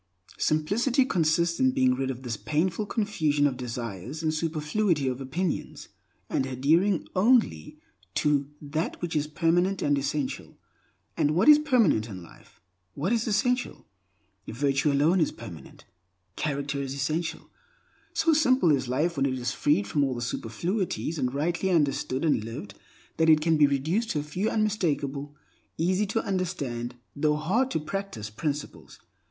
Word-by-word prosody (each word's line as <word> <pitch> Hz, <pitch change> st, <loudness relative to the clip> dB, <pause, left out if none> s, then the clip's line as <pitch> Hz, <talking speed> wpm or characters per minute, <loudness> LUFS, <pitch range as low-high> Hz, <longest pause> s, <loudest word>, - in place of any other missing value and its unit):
Simplicity 225 Hz, -, +2 dB
consists 170 Hz, -4 st, +1 dB
in 260 Hz, 0 st, +3 dB
being 130 Hz, -, +3 dB
rid 135 Hz, +1 st, -2 dB
of 130 Hz, 0 st, -5 dB
this 120 Hz, -3 st, -3 dB
painful 170 Hz, -, -1 dB
confusion 155 Hz, -11 st, +1 dB
of 140 Hz, -3 st, +1 dB
desires 120 Hz, -, -6 dB
and 155 Hz, -1 st, +1 dB
superfluity 155 Hz, 0 st, 0 dB
of 130 Hz, +1 st, -2 dB
opinions, 160 Hz, +6 st, -3 dB, 0.4 s
and 130 Hz, -, -1 dB
adhering 160 Hz, +9 st, +2 dB
only 195 Hz, -, +2 dB, 0.4 s
to 145 Hz, -2 st, +1 dB
that 155 Hz, +3 st, -3 dB
which 175 Hz, -2 st, -4 dB
is 150 Hz, 0 st, +1 dB
permanent 175 Hz, +5 st, +1 dB
and 145 Hz, -1 st, +2 dB
essential. 140 Hz, 0 st, -3 dB, 0.6 s
And 150 Hz, +1 st, +1 dB
what 190 Hz, -, +3 dB
is 300 Hz, 0 st, +9 dB
permanent 230 Hz, -, +2 dB
in 95 Hz, -4 st, -8 dB
life? 85 Hz, -, -18 dB, 0.4 s
What 170 Hz, +10 st, 0 dB
is 230 Hz, 0 st, 0 dB
essential? 245 Hz, +3 st, 0 dB, 0.6 s
Virtue 135 Hz, +4 st, +1 dB
alone 155 Hz, +6 st, +3 dB
is 155 Hz, -, +2 dB
permanent; 95 Hz, -9 st, -11 dB, 0.5 s
character 140 Hz, -1 st, -2 dB
is 135 Hz, 0 st, -4 dB
essential. 155 Hz, +4 st, -3 dB, 0.6 s
So 325 Hz, -, +2 dB
simple 255 Hz, -, +4 dB
is 135 Hz, -3 st, +1 dB
life 155 Hz, +6 st, 0 dB
when 135 Hz, 0 st, +2 dB
it 130 Hz, -1 st, -2 dB
is 120 Hz, 0 st, -2 dB
freed 165 Hz, +8 st, +1 dB
from 145 Hz, -, 0 dB
all 130 Hz, -3 st, -1 dB
superfluities 165 Hz, -, -2 dB
and 125 Hz, -2 st, 0 dB
rightly 165 Hz, +7 st, -1 dB
understood 140 Hz, -4 st, +1 dB
and 145 Hz, -9 st, +2 dB
lived 110 Hz, -3 st, -7 dB, 0.4 s
that 160 Hz, 0 st, +3 dB
it 155 Hz, -1 st, +7 dB
can 165 Hz, +1 st, +3 dB
be 150 Hz, -1 st, +5 dB
reduced 160 Hz, -, 0 dB
to 150 Hz, -, 0 dB
a -, -, -7 dB
few 180 Hz, +8 st, -2 dB
unmistakable, 145 Hz, -10 st, -1 dB, 0.4 s
easy 185 Hz, +5 st, +1 dB
tounderstand, 180 Hz, -, -2 dB, 0.2 s
though 150 Hz, +1 st, +2 dB
hard 195 Hz, +13 st, +1 dB
to 160 Hz, -, -1 dB
practice 150 Hz, -, -5 dB
principles. 145 Hz, +5 st, -5 dB
155 Hz, 150 wpm, -27 LUFS, 135-185 Hz, 0.6 s, is